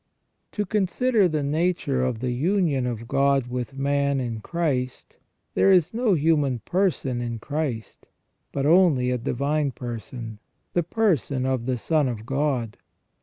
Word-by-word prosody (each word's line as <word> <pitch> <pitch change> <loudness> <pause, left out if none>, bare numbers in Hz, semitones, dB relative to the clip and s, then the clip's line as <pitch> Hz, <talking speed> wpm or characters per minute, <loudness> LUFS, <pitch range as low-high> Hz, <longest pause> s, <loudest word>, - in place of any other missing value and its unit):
To 210 - -1
consider 210 +2 +2
the 155 -3 -1
nature 150 -3 0
of 125 -3 -2
the 125 -1 -1
union 150 -1 +1
of 115 -1 -5
God 140 0 +2
with 125 +2 -5
man 140 0 +1
in 120 -3 -3
Christ, 130 -3 -3 0.4
there 195 - +4
is 180 -2 +4
no 230 -4 +2
human 150 -4 +2
person 135 - -1
in 120 -1 -3
Christ, 135 -2 -4 0.4
but 140 -1 -2
only 155 -7 +4
a 125 - -1
divine 140 +5 0
person, 120 -2 -7 0.3
the 175 - +2
person 160 - 0
of 130 -2 -1
the 130 -1 0
Son 150 +3 +1
of 115 -3 -5
God. 130 -4 -1
140 Hz, 145 wpm, -24 LUFS, 125-165 Hz, 0.4 s, there